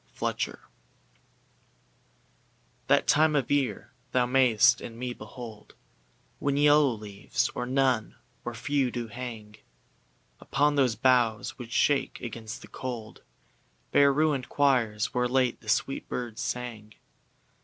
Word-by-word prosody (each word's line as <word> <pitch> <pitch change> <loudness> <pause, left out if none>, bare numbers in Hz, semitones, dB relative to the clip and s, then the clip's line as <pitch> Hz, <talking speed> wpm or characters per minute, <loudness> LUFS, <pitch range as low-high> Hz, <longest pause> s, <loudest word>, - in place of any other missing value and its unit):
LXXIII - - -1 2.3
That - - +4
time 155 0 +4
of 140 -4 0
year 140 -3 -1 0.2
thou 125 -1 +3
mayst 120 -2 +4
in 115 - -8
me 125 0 -4
behold 110 -1 -11 0.6
When 140 0 0
yellow 145 0 +5
leaves, 105 -4 -2
or 125 - -4
none, 130 -4 +1 0.3
or 120 0 -5
few, 130 +2 0
do 120 -2 -5
hang 110 -3 -8 0.8
Upon 145 +1 +1
those 130 -5 +2
boughs 120 -2 +2
which 120 -2 -8
shake 140 +2 +1
against 115 -1 -7
the - - -11
cold, 120 -4 -7 0.7
Bare 140 0 +5
ruinŌĆÖd 145 -2 +1
choirs, 120 -7 +1
where 125 0 +1
late 125 -1 +1
the 110 - -9
sweet 135 - 0
birds 120 -3 -4
sang. 115 -4 -5
125 Hz, 120 wpm, -28 LUFS, 115-135 Hz, 2.3 s, yellow